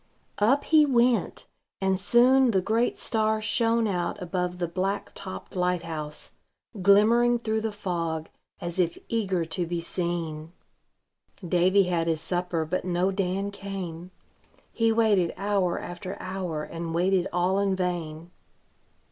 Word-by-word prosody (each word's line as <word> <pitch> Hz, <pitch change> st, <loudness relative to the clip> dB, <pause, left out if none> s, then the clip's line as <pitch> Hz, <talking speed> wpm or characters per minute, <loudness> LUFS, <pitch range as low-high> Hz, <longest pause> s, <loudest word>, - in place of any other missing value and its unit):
Up 260 Hz, +8 st, +3 dB
he 315 Hz, -1 st, +5 dB
went, 245 Hz, -4 st, +2 dB, 0.3 s
and 190 Hz, -1 st, +1 dB
soon 250 Hz, +5 st, +5 dB
the 195 Hz, -4 st, +3 dB
great 225 Hz, +6 st, 0 dB
star 220 Hz, -1 st, 0 dB
shone 230 Hz, +1 st, +1 dB
out 185 Hz, 0 st, -2 dB
above 180 Hz, -1 st, -2 dB
the 175 Hz, -1 st, -1 dB
black 195 Hz, +4 st, -2 dB
topped 185 Hz, 0 st, -8 dB
light 180 Hz, -1 st, 0 dB
house, 155 Hz, -2 st, -6 dB, 0.5 s
glimmering 225 Hz, +5 st, +5 dB
through 220 Hz, -2 st, -1 dB
the 220 Hz, 0 st, -2 dB
fog, 170 Hz, -6 st, -3 dB, 0.3 s
as 175 Hz, 0 st, -5 dB
if 170 Hz, -2 st, +1 dB
eager 190 Hz, -7 st, 0 dB
to 165 Hz, +2 st, -3 dB
be 175 Hz, 0 st, -2 dB
seen. 170 Hz, -2 st, -4 dB, 0.9 s
Davy 185 Hz, +3 st, +4 dB
had 175 Hz, -2 st, 0 dB
his 160 Hz, -1 st, +1 dB
supper, 175 Hz, 0 st, -2 dB
but 180 Hz, +4 st, -2 dB
no 180 Hz, +1 st, +1 dB
Dan 195 Hz, +1 st, -1 dB
came. 185 Hz, -4 st, -6 dB, 0.6 s
He 225 Hz, -1 st, +2 dB
waited 215 Hz, -6 st, +2 dB
hour 195 Hz, -3 st, 0 dB
after 180 Hz, +2 st, -6 dB
hour, 185 Hz, -5 st, -4 dB
and 165 Hz, +1 st, -5 dB
waited 185 Hz, +1 st, +2 dB
all 180 Hz, +2 st, +1 dB
in 200 Hz, -1 st, +1 dB
vain. 175 Hz, -3 st, -3 dB
185 Hz, 140 wpm, -26 LUFS, 175-210 Hz, 0.9 s, he